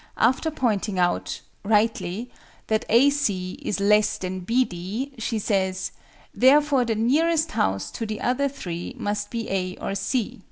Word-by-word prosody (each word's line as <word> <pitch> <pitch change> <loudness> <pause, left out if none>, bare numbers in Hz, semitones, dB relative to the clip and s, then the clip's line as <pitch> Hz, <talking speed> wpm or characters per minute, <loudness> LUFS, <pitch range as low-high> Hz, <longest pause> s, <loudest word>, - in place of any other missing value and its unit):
After 260 +7 +2
pointing 220 -9 -1
out 175 -1 0 0.2
(rightly) 220 +1 0 0.3
that 220 +1 0
AC 230 -7 +3
is 205 - -2
less 210 +1 +3
than 185 0 -4
BD 225 +2 -1
she 225 0 -1
says, 190 -3 -1 0.4
"therefore 275 0 +4
the 225 -1 0
nearest 315 +8 +2
house 95 - 0
to 225 - -4
the 215 0 -4
other 275 +3 +1
three 175 -11 -6
must 205 0 -2
be 230 -2 -4
A 185 -1 -2
or - - -3
C." 215 +3 -2
220 Hz, 145 wpm, -24 LUFS, 190-255 Hz, 0.4 s, therefore